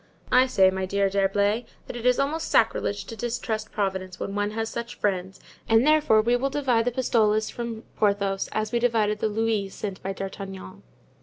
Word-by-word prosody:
"I 255 +1 +5
say, 190 -6 +4
my 190 0 -3
dear 200 0 +1
D'Herblay, 200 +3 +1 0.2
that - - -8
it 240 +1 -2
is 250 - +4
almost 295 +4 -1
sacrilege 205 -3 +1
to 225 - -8
distrust 225 -2 -3
Providence 190 -2 -3
when 195 - -4
one 205 0 0
has 225 +1 -3
such 235 +1 -5
friends, 190 -1 -2 0.3
and 225 +2 +5
therefore 300 -8 +4
we 240 +2 +3
will 265 +3 0
divide 260 -5 +1
the 245 - +1
pistoles 220 -4 +1
from 235 -2 -5
Porthos, 200 -2 +1
as 215 0 -2
we 240 - +1
divided 220 -3 +1
the 220 - 0
louis 215 -2 0
sent 195 0 -6
by 195 - -3
D'Artagnan." 195 - -7
215 Hz, 185 wpm, -25 LUFS, 195-235 Hz, 0.3 s, I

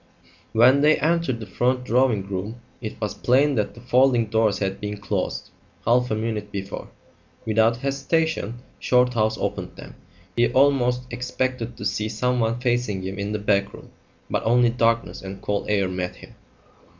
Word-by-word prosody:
When 130 +5 +5
they 150 +1 +5
entered 165 -6 0
the 110 - -6
front 125 +6 0
drawing 120 -5 +2
room 100 +5 -4 0.2
it 110 -3 -6
was 105 -1 -2
plain 140 +4 +3
that 105 -5 -1
the 120 - -12
folding 125 -1 +3
doors 110 -1 +1
had 95 -1 -3
been 105 0 -4
closed 100 - -3 0.3
half 125 +2 +3
a 110 - 0
minute 110 -2 -3
before. 100 -1 -5 0.6
Without 110 +1 +3
hesitation 135 -2 -1 0.2
Shorthouse 125 -3 +2
opened - - -4
them. - - -11 0.4
He 120 0 +3
almost 130 -2 +3
expected 125 -1 -3
to - - -6
see 110 0 -1
someone 120 0 0
facing 120 -6 0
him 95 +1 -5
in 100 +1 -2
the 105 - -1
back 100 -1 +1
room; - - -14 0.4
but - - -1
only 120 +1 +4
darkness 115 -1 0
and 95 0 -7
cold 100 0 -2
air 100 -2 +2
met 90 -1 -3
him. - - -14
115 Hz, 160 wpm, -23 LUFS, 105-125 Hz, 0.6 s, When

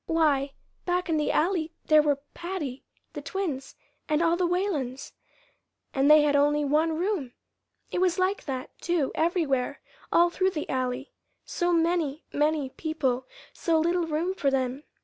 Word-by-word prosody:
Why, 285 -4 +2 0.3
back 360 0 -1
in 320 - +2
the 300 - +1
Alley 330 -2 +1
there 310 -1 +6
were 290 -2 +1
Patty, 340 -8 -5 0.3
the - - -5
twins, 335 -10 -4 0.3
and 305 +2 +2
all 335 0 +3
the 355 0 +1
Whalens 330 -9 -2 0.8
and 275 +2 +3
they 305 0 +8
had 290 -1 +2
only 295 +1 +3
one 315 +3 +2
room! 340 - -1 0.6
It 360 - -1
was 365 -1 +2
like 375 +2 0
that, 260 -3 -5
too, 340 -6 0
everywhere, 315 -6 0 0.3
all 345 0 +5
through 375 +2 +2
the 315 -5 -4
Alley 255 +1 -2 0.3
so 350 -1 0
many, 330 -3 +1
many 295 -2 +1
people, 265 -5 -2 0.3
so 330 -1 +1
little 340 +1 +1
room 325 +4 -1
for 285 -7 +1
them. 265 +1 -1
310 Hz, 155 wpm, -27 LUFS, 275-345 Hz, 0.8 s, they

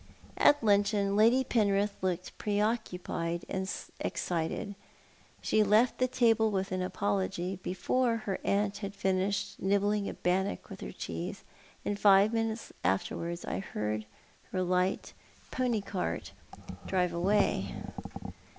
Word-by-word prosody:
At 290 -3 +5
luncheon 200 -1 +3
Lady 230 +5 +5
Penrith 205 -4 +2
looked 185 -1 -2
pre 205 -1 -1
occuioied 180 -6 -1
and 190 0 -2 0.3
excited. 175 +4 -2 0.7
She 215 - +3
left 215 +4 +4
the 255 - +3
table 230 -3 +3
with 195 -1 -1
an 185 0 -1
apology, 175 - -1
before 230 +8 +1
her 195 -2 -2
aunt 200 0 +1
had 200 -1 -6
finished 195 +1 -1
nibbling 200 +1 +1
a - - -6
bannock 190 +3 -1
with - - -8
her - - -5
cheese, - - -5 0.4
and 205 0 -1
five 200 +2 +6
minutes 225 0 -2
afterwards 170 - -1
I - - -2
heard 105 - -3 0.4
her 185 -1 0
light 180 +1 0 0.4
pony 245 -4 0
cart 195 -2 -3 0.6
drive 180 -2 +1
away. 175 - +1
200 Hz, 125 wpm, -31 LUFS, 185-210 Hz, 0.7 s, five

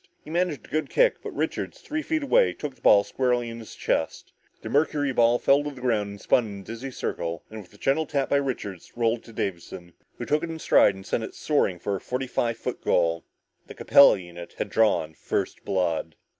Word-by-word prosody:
He 155 - -10
managed 175 -3 -1
a - - -18
good 155 0 -1
kick, - - +3
but - - -6
Richards, - - -3
three 305 -9 -4
feet 315 -1 -1
away, 485 - +3
took 150 -3 -6
the - - -27
ball 100 -1 +6
squarely 125 0 0
on 115 - -8
his 110 - -11
chest. 80 - -2 0.3
The - - -5
mercuryball 140 -5 +2
fell 140 +1 +4
to 145 - -3
the 135 -3 -11
ground, 105 -5 -1
spun 120 -3 +2
in 100 -1 -8
a - - -13
dizzy 115 +6 -7
circle 85 -9 -4
and 110 0 -7
with 95 - -17
a - - -16
gentle 145 +7 +1
tap 140 -2 -1
by 140 - +3
Richards, 115 -10 -4
rolled 115 0 0
to 115 - -12
Davison, 85 -4 -5 0.2
who - - -5
took 150 +1 +1
it 170 - -4
in 165 - -5
stride 100 -9 +4
and 95 0 -11
sent 110 - -1
it - - -7
soaring 145 - +1
for 100 +3 -2
a - - -12
forty 125 +1 -3
five 115 -2 -1
yard - - -3
goal. 85 -1 +1 0.4
The - - -10
Capella 140 -6 +6
unit 85 -2 -10
had - - -3
drawn 100 -8 +2
first - - -3
blood. 85 -5 -1
115 Hz, 220 wpm, -25 LUFS, 100-145 Hz, 0.4 s, ball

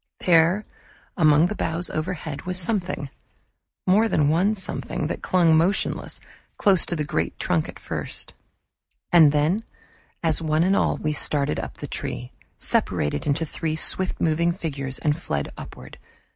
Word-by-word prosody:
There 175 +4 +4 0.5
among 155 -3 +5
the 180 - -1
boughs 170 -1 -2
overhead 155 -2 -4
was 185 0 +1
something 180 -7 -1 0.7
more 210 +5 +4
than 150 -8 +2
one 185 +7 +2
something 180 -3 -3
that 155 - -4
clung 170 -3 +3
motionless, 175 +6 0 0.4
close 195 -4 +3
to 175 - -1
the 155 - -1
great - - -2
trunk - - 0
at - - -9
first, - - -5 0.8
and 160 -4 +7
then, 155 +9 +1 0.6
as 160 -1 +2
one 155 0 +1
and 190 +2 +3
all - - +1
we 155 -1 -2
started 145 - +3
up - - -6
the - - -6
tree, - - -5 0.3
separated 75 - -1
into 150 +3 +1
three 155 +1 -3
swift 185 +3 +1
moving 170 +1 +2
figures 140 -7 -4
and 150 +1 -1
fled 70 - -3
upward. - - -11
165 Hz, 150 wpm, -24 LUFS, 150-180 Hz, 0.8 s, and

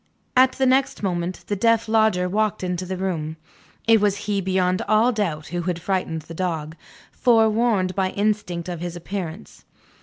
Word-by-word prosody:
At 255 0 +5
the 265 - 0
next 260 -3 +2
moment, 180 -1 -2
the 205 - -2
deaf 230 +2 +2
Lodger 220 -5 +3
walked 215 +1 0
into 180 0 -3
the 185 0 -3
room. 165 -4 -3 0.5
It 225 -2 +6
was 205 -1 +2
he 200 -1 0
beyond 185 -1 +1
all 220 +3 +4
doubt 170 -9 -2
who 175 0 -2
had 175 -1 -2
frightened 175 -3 -2
the 165 - -10
dog, 165 -3 -3 0.4
forewarned 220 -4 +2
by 190 -1 0
instinct 200 -4 -1
of 175 -2 -4
his 175 0 -4
appearance. 175 +1 -6
190 Hz, 170 wpm, -23 LUFS, 175-215 Hz, 0.5 s, It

